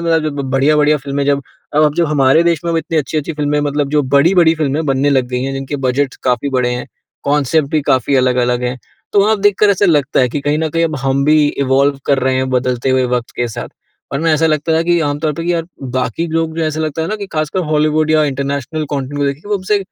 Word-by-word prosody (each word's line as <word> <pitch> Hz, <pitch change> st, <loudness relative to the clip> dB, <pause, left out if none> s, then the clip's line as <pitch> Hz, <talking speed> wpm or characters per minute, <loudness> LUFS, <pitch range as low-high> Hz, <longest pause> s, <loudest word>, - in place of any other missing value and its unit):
बढ़िया-बढ़िया 150 Hz, -2 st, +1 dB
फ़िल्में 140 Hz, 0 st, -3 dB
जब 140 Hz, 0 st, +1 dB, 0.3 s
अब 150 Hz, -, +4 dB
अब 150 Hz, -, +1 dB
जो 170 Hz, 0 st, +1 dB
हमारे 145 Hz, +1 st, +3 dB
देश 170 Hz, -3 st, +1 dB
में 170 Hz, -, -1 dB
वो 165 Hz, -, +1 dB
इतनी 165 Hz, 0 st, -2 dB
अच्छी-अच्छी 155 Hz, +2 st, -2 dB
फ़िल्में 150 Hz, -1 st, -1 dB
मतलब 145 Hz, 0 st, -1 dB
जो 150 Hz, -1 st, +2 dB
बड़ी-बड़ी 160 Hz, +5 st, +4 dB
फ़िल्में 155 Hz, 0 st, -1 dB
बनने 135 Hz, +1 st, +1 dB
लग 130 Hz, -3 st, +2 dB
गई 125 Hz, 0 st, -2 dB
हैं, 135 Hz, +1 st, -3 dB
जिनके 135 Hz, +1 st, -4 dB
बजट 130 Hz, 0 st, -1 dB
काफ़ी 125 Hz, +2 st, 0 dB
बड़े 125 Hz, -2 st, 0 dB
हैं। 125 Hz, -, -5 dB, 0.4 s
कॉनसेप्ट 145 Hz, 0 st, +1 dB
भी 155 Hz, -, +1 dB
काफ़ी 130 Hz, +1 st, +1 dB
अलग-अलग 125 Hz, -1 st, +1 dB
हैं। 125 Hz, +1 st, -2 dB, 0.3 s
तो 205 Hz, -, +4 dB
वहाँ 215 Hz, 0 st, +2 dB
देखकर 205 Hz, 0 st, +3 dB
ऐसा 200 Hz, +1 st, +2 dB
लगता 145 Hz, -5 st, +2 dB
है 125 Hz, -, +2 dB
कि 145 Hz, +4 st, -3 dB
कहीं 145 Hz, +2 st, 0 dB
न 160 Hz, 0 st, -1 dB
कहीं 165 Hz, +2 st, +1 dB
अब 155 Hz, -3 st, -2 dB
हम 135 Hz, 0 st, +1 dB
भी 155 Hz, +1 st, +4 dB, 0.3 s
इवॉल्व 135 Hz, +1 st, +2 dB
कर 140 Hz, -2 st, +2 dB
रहे 130 Hz, 0 st, +1 dB
हैं 130 Hz, 0 st, -1 dB
बदलते 125 Hz, 0 st, 0 dB
हुए 130 Hz, 0 st, +2 dB
वक़्त 120 Hz, -1 st, -5 dB
के 120 Hz, -1 st, -1 dB
साथ। 110 Hz, -, -6 dB, 0.4 s
वरना 160 Hz, +4 st, 0 dB
ऐसा 160 Hz, +1 st, +2 dB
लगता 155 Hz, +1 st, 0 dB
था -, -, +1 dB
कि 175 Hz, +1 st, +2 dB
आमतौर 150 Hz, +2 st, -1 dB
पे 165 Hz, +3 st, -5 dB
कि 175 Hz, -, +1 dB
यार 165 Hz, -1 st, -2 dB, 0.3 s
बाकी 130 Hz, +6 st, -1 dB
लोग 160 Hz, 0 st, -2 dB
जो 160 Hz, -, +1 dB
ऐसा 155 Hz, 0 st, -2 dB
लगता 155 Hz, +1 st, -2 dB
है 165 Hz, -, -3 dB
ना 215 Hz, -, -2 dB
कि 200 Hz, -1 st, -6 dB
ख़ासकर 155 Hz, +4 st, -1 dB
हॉलीवुड 155 Hz, 0 st, +1 dB
या 155 Hz, -1 st, +4 dB
इंटरनेशनल 140 Hz, +2 st, -3 dB
कंटेंट 140 Hz, +1 st, -3 dB
को 145 Hz, -, +1 dB
देखे 140 Hz, +7 st, -4 dB
वो 210 Hz, -, +1 dB
उनसे 195 Hz, +2 st, 0 dB
145 Hz, 240 wpm, -16 LUFS, 135-160 Hz, 0.4 s, अब